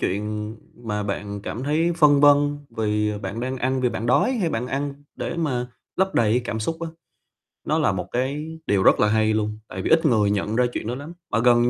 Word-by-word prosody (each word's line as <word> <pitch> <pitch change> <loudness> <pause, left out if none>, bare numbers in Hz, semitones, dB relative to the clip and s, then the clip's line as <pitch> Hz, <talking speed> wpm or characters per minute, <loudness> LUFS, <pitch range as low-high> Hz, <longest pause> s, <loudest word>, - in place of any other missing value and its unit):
chuyện 105 +2 -2 0.3
mà 105 -2 -2
bạn 100 0 -4
cảm 120 - -5
thấy 160 +5 +1
phân 150 -4 +5
vân 145 0 +5 0.2
vì 105 -1 0
bạn 100 +3 -5
đang 130 +2 -2
ăn 130 +1 0
vì 125 - +2
bạn 115 -1 -4
đói 125 - +3
hay 200 -10 0
bạn 115 +2 -2
ăn 140 +2 -2 0.2
để 170 - -4
mà 130 -7 -1 0.3
lấp 190 0 +1
đầy 110 -2 +3
cái 125 - +3
cảm 110 -2 -3
xúc 165 +9 -2
á, 165 - -2 0.8
nó - - +2
là - - +3
một - - -3
cái 145 +6 -2
điều 100 -2 +2
rất - - +5
là 105 - +4
hay 110 0 +2
luôn, 105 0 -1
tại 95 - -6
vì - - -2
ít 160 0 +4
người 110 -7 +3
nhận 105 +1 -1
ra 125 +1 +3
chuyện - - -4
đó 120 - -2
lắm, 145 +5 -8 0.2
mà 105 - +2
gần 120 0 +4
120 Hz, 230 wpm, -23 LUFS, 105-145 Hz, 0.8 s, phân